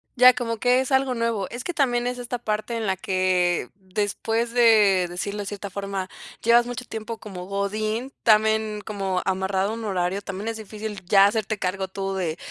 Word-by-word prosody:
Ya, 250 Hz, 0 st, +8 dB
como 230 Hz, -2 st, -3 dB
que 250 Hz, +3 st, +3 dB
es 265 Hz, -, -4 dB
algo 265 Hz, -1 st, +3 dB
nuevo, 230 Hz, -4 st, -1 dB
es 240 Hz, +1 st, -6 dB
que 355 Hz, -, -3 dB
también 245 Hz, -5 st, +1 dB
es 250 Hz, 0 st, -2 dB
esta 245 Hz, 0 st, -4 dB
parte 215 Hz, +1 st, -2 dB
en 225 Hz, -1 st, -2 dB
la 190 Hz, -1 st, 0 dB
que 180 Hz, -6 st, +1 dB
después 210 Hz, +4 st, -2 dB
de 210 Hz, -6 st, +5 dB
decirlo 200 Hz, +4 st, -4 dB
de -, -, -5 dB
cierta 200 Hz, 0 st, -6 dB
forma, 195 Hz, -1 st, -4 dB, 0.3 s
llevas 235 Hz, +1 st, +5 dB
mucho 245 Hz, +1 st, -5 dB
tiempo 225 Hz, -1 st, -6 dB
como 185 Hz, -4 st, -8 dB
godín 215 Hz, +5 st, -2 dB
también, 215 Hz, -1 st, +3 dB
como 195 Hz, -3 st, -2 dB
amarrado 190 Hz, +1 st, 0 dB
a -, -, -3 dB
un 230 Hz, -1 st, -6 dB
horario, 190 Hz, 0 st, -1 dB
también 205 Hz, +3 st, -5 dB
es 225 Hz, -, -4 dB
difícil 215 Hz, -2 st, -7 dB
ya 195 Hz, +1 st, +6 dB
hacerte 215 Hz, 0 st, 0 dB
cargo 190 Hz, +1 st, -2 dB
tú 195 Hz, 0 st, -4 dB
de 175 Hz, -3 st, -2 dB
210 Hz, 190 wpm, -24 LUFS, 190-230 Hz, 0.3 s, Ya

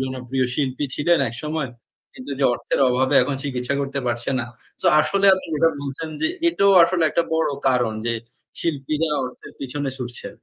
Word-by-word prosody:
জনপ্রিয় 130 Hz, 0 st, -2 dB
শিল্পী 135 Hz, 0 st, -1 dB
ছিলেন 170 Hz, +3 st, +3 dB
একসময়। 150 Hz, +2 st, -4 dB, 0.4 s
কিন্তু 130 Hz, -, -9 dB
যে 140 Hz, -, +1 dB
অর্থের -, -, -2 dB
অভাবে 130 Hz, +1 st, +1 dB
এখন 145 Hz, -, -1 dB
চিকিৎসা 130 Hz, -1 st, -2 dB
করতে 140 Hz, 0 st, -3 dB
পারছে 120 Hz, +1 st, -2 dB
না। -, -, -3 dB, 0.4 s
সো -, -, +1 dB
আসলে 200 Hz, +5 st, +2 dB
আপনি 185 Hz, -, -6 dB
যেটা 165 Hz, +2 st, +4 dB
বলছেন 140 Hz, +3 st, -5 dB
যে -, -, +2 dB, 0.2 s
এটাও 200 Hz, -11 st, +3 dB
আসলে 170 Hz, 0 st, 0 dB
একটা 170 Hz, -, +1 dB
বড় 160 Hz, -, +2 dB, 0.2 s
কারণ 125 Hz, -3 st, +2 dB
যে 115 Hz, -, +1 dB, 0.5 s
শিল্পীরা 155 Hz, 0 st, -1 dB, 0.2 s
অর্থের 125 Hz, -, -9 dB
পিছনে 140 Hz, +1 st, -3 dB
ছুটছে। 120 Hz, -1 st, -6 dB
140 Hz, 165 wpm, -22 LUFS, 125-160 Hz, 0.5 s, যেটা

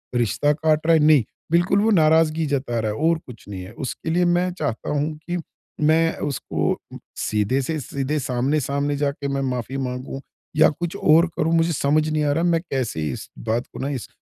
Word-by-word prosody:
रिश्ता 120 Hz, +5 st, +2 dB
काट 155 Hz, 0 st, +1 dB
रहा 165 Hz, -, +6 dB
है, 160 Hz, -, +4 dB
नहीं। 150 Hz, -5 st, +6 dB, 0.3 s
बिल्कुल 175 Hz, +3 st, +3 dB
वो 225 Hz, -, +3 dB
नाराज़गी 160 Hz, -2 st, +4 dB
जता 135 Hz, -5 st, -1 dB
रहा 110 Hz, -1 st, -1 dB
है 105 Hz, -, -5 dB
और 165 Hz, +1 st, +2 dB
कुछ 120 Hz, -4 st, -12 dB
नहीं 95 Hz, -2 st, -6 dB
है। 95 Hz, -, -10 dB
उसके 130 Hz, +6 st, -5 dB
लिए 175 Hz, +2 st, +2 dB
मैं 175 Hz, +1 st, +2 dB
चाहता 150 Hz, -9 st, -3 dB
हूँ 150 Hz, +1 st, 0 dB, 0.2 s
कि 175 Hz, -, 0 dB, 0.5 s
मैं 165 Hz, +1 st, +4 dB
उसको 145 Hz, -3 st, -1 dB, 0.4 s
सीधे 105 Hz, +6 st, 0 dB
से 155 Hz, +4 st, -2 dB
सीधे 140 Hz, +2 st, -2 dB
सामने-सामने 140 Hz, +2 st, 0 dB
जाके 140 Hz, 0 st, -1 dB
मैं 140 Hz, 0 st, -1 dB
माफी 125 Hz, +2 st, -3 dB
माँगूँ 130 Hz, +1 st, -4 dB, 0.3 s
या 155 Hz, -, +6 dB
कुछ 175 Hz, +4 st, -4 dB
और 165 Hz, -2 st, +5 dB
करूँ। 160 Hz, +2 st, +1 dB
मुझे 165 Hz, +1 st, +2 dB
समझ 150 Hz, +2 st, +2 dB
नहीं 155 Hz, -1 st, 0 dB
आ 145 Hz, -, +2 dB
रहा 165 Hz, +4 st, +1 dB
मैं 170 Hz, -2 st, +2 dB
कैसे 120 Hz, -, -2 dB
इस -, -, -7 dB
बात 115 Hz, +2 st, -2 dB
को -, -, -8 dB
ना 135 Hz, -, -2 dB
इस 135 Hz, -5 st, -4 dB
145 Hz, 200 wpm, -22 LUFS, 130-160 Hz, 0.5 s, रहा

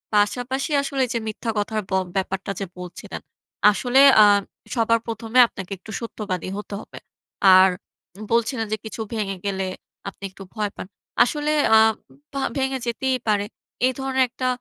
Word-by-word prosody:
পাশাপাশি 250 Hz, +7 st, 0 dB
আসলে 275 Hz, -1 st, -1 dB
যে, 235 Hz, -, 0 dB
মিথ্যা 220 Hz, +2 st, -3 dB
কথার 215 Hz, +1 st, -1 dB
ব -, -, -16 dB, 0.2 s
ব্যাপারটা 190 Hz, +1 st, -2 dB
যে 195 Hz, -, -2 dB
বলছিলেন। 180 Hz, -1 st, -8 dB, 0.5 s
আসলে, 245 Hz, +5 st, +3 dB, 0.2 s
আ -, -, +8 dB, 0.5 s
সবার 230 Hz, -1 st, +3 dB
১ম 225 Hz, 0 st, -5 dB
এ -, -, +9 dB
আপনাকে 190 Hz, -3 st, -9 dB
একটু 205 Hz, +4 st, -12 dB
সত্যবাদী 205 Hz, -6 st, -4 dB
হতে 210 Hz, 0 st, -7 dB
হবে। -, -, -12 dB, 0.6 s
আর, 190 Hz, +1 st, +7 dB, 0.6 s
বলছিলেন 230 Hz, 0 st, +1 dB
যে, 215 Hz, -, 0 dB
কিছু 220 Hz, -, -6 dB
ভেঙে 200 Hz, -4 st, -2 dB
গেলে 195 Hz, -1 st, -1 dB, 0.4 s
আপনি 195 Hz, -, -18 dB
একটু 195 Hz, -, -11 dB
ভয় 210 Hz, -2 st, -1 dB
পান। -, -, -7 dB, 0.4 s
আসলে 295 Hz, +4 st, -1 dB, 0.3 s
আ -, -, +8 dB, 0.5 s
ভা 275 Hz, -, -2 dB, 0.2 s
ভেঙে 265 Hz, -1 st, 0 dB
যেতেই 255 Hz, +2 st, 0 dB
পারে। 205 Hz, -1 st, +2 dB, 0.4 s
এই 255 Hz, -, +2 dB
ধরনের 265 Hz, -1 st, +1 dB
একটা 255 Hz, +1 st, -3 dB
225 Hz, 155 wpm, -23 LUFS, 200-255 Hz, 0.6 s, এ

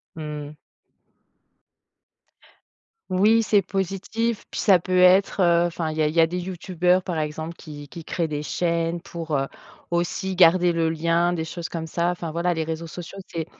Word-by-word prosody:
Mmh. 150 Hz, -1 st, -6 dB, 2.5 s
Oui, 215 Hz, +5 st, +4 dB
c'est 205 Hz, -2 st, +3 dB
positif, 195 Hz, +4 st, -2 dB
puis, -, -, -5 dB
ça 190 Hz, -3 st, +5 dB
peut 185 Hz, +1 st, -1 dB
être, 185 Hz, +2 st, +5 dB
heu, 170 Hz, -1 st, +4 dB
enfin, 165 Hz, -2 st, -3 dB
il 155 Hz, -, -6 dB
y 155 Hz, -, +1 dB
a 150 Hz, -, +3 dB
il 155 Hz, -, -3 dB
y -, -, +3 dB
a 165 Hz, -, +7 dB
des 175 Hz, +2 st, -3 dB
youtubeurs, 180 Hz, 0 st, 0 dB
par 170 Hz, -3 st, -3 dB
exemple, 155 Hz, +2 st, -4 dB
qui 145 Hz, -3 st, -10 dB
qui 165 Hz, +2 st, -10 dB
créent 170 Hz, 0 st, -2 dB
des 150 Hz, -1 st, -3 dB
chaînes 170 Hz, +1 st, -1 dB
pour, 165 Hz, -3 st, -5 dB
heu, 135 Hz, -, -1 dB, 0.4 s
aussi 175 Hz, +2 st, -1 dB
garder 175 Hz, 0 st, +5 dB
le 165 Hz, -1 st, +1 dB
lien, 170 Hz, +2 st, +1 dB
des 160 Hz, -2 st, -2 dB
choses 170 Hz, +1 st, -6 dB
comme 165 Hz, -1 st, -4 dB
ça, 170 Hz, +2 st, 0 dB
enfin 170 Hz, -2 st, -4 dB
voilà, 170 Hz, +2 st, 0 dB
les 160 Hz, -, -1 dB
réseaux 165 Hz, +1 st, -4 dB
sociaux, 175 Hz, +4 st, -9 dB
c'est 165 Hz, -2 st, -4 dB
170 Hz, 180 wpm, -24 LUFS, 160-180 Hz, 2.5 s, a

